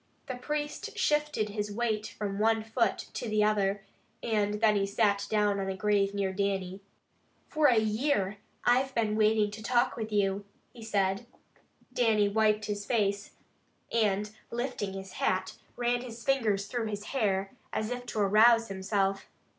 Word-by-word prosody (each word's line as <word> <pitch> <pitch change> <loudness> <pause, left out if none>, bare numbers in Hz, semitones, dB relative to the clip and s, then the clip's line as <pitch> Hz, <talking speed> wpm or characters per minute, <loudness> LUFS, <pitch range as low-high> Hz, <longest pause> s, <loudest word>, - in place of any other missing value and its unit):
The 260 - -4
priest 295 +3 -4
shifted 295 -8 +1
his 210 0 -3
weight 215 -1 -1
from 200 -1 -4
one 220 0 +2
foot 225 +2 +1 0.2
to 235 - -4
the 215 0 +2
other, 200 -2 +1 0.4
and 210 -2 +1
then 215 0 +3
he 200 -1 +1
sat 200 -1 +1
down 210 -2 +2
on 195 0 -2
a 190 - -2
grave 200 -1 +1
near 195 -1 -1
Dannie. 195 -1 -2 0.7
"For 305 -1 +3
a 240 - +4
year 215 -2 +1 0.3
I 245 +1 +5
have 265 0 -4
been 215 -2 +1
waiting 215 -1 +3
to 215 +1 -8
talk 240 +2 +1
with 220 -1 -5
you," 200 -1 +1 0.3
he 240 - -12
said. 200 0 0 0.7
Dannie 215 -4 +3
wiped 215 0 +2
his 205 -1 -3
face, 205 -3 0 0.6
and 210 -2 +1 0.2
lifting 235 -5 -3
his 195 -1 -7
hat, 185 0 -1 0.2
ran 240 0 0
his 235 -2 -9
fingers 220 -8 +1
through 235 0 -3
his 205 -1 -4
hair, 195 -6 0 0.2
as 220 +2 -2
if 245 0 -5
to 215 - -2
arouse 230 +3 +5
himself. 195 0 -1
210 Hz, 160 wpm, -29 LUFS, 200-230 Hz, 0.7 s, I